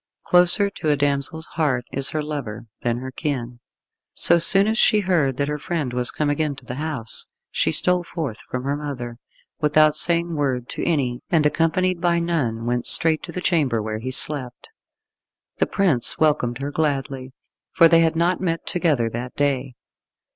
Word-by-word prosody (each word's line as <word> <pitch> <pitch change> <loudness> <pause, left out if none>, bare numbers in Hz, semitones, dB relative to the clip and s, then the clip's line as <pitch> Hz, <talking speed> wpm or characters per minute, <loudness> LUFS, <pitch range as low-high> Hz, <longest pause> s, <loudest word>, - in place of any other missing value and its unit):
Closer 180 +3 +4
to 160 -5 -4
a 145 - +2
damsel's 140 +3 -1
heart 135 -7 -1
is 135 0 +2
her 155 -1 -3
lover 140 -8 -6 0.2
than 120 -1 -1
her 130 +1 -7
kin. 125 -5 -4 0.5
So 170 0 +4
soon 195 +4 +6
as 220 +2 0
she 215 -2 +4
heard 160 -9 0
that 140 - -1
her 150 0 -3
friend 150 -5 -3
was 125 0 +2
come 150 - -2
again 145 0 -1
to 130 - -15
the 125 - -6
house, 145 -9 -1 0.2
she - - 0
stole 180 -1 +3
forth 155 -10 -6
from 125 0 -4
her 140 +1 -1
mother, 125 -5 -7 0.4
without 155 0 +3
saying 170 0 +2
word 130 -5 -2
to - - -5
any, 130 -6 -1
and 160 -5 +2
accompanied 170 +4 0
by 175 -1 +1
none, 145 -10 -2
went 120 0 -2
straight 160 -1 +4
to 170 - -8
the 180 - -5
chamber 145 -11 +1
where 110 0 -4
he 130 +3 -5
slept. 130 -2 -1 0.9
The - - +1
prince 165 -12 +1
welcomed 135 -6 +1
her 145 - -4
gladly, 135 -3 -3 0.4
for 165 - +5
they 165 0 +4
had 165 -1 +2
not 175 +3 0
met 165 -3 -2
together 155 -10 0
that 120 +2 -6
day. 135 -3 -1
145 Hz, 180 wpm, -21 LUFS, 125-165 Hz, 0.9 s, soon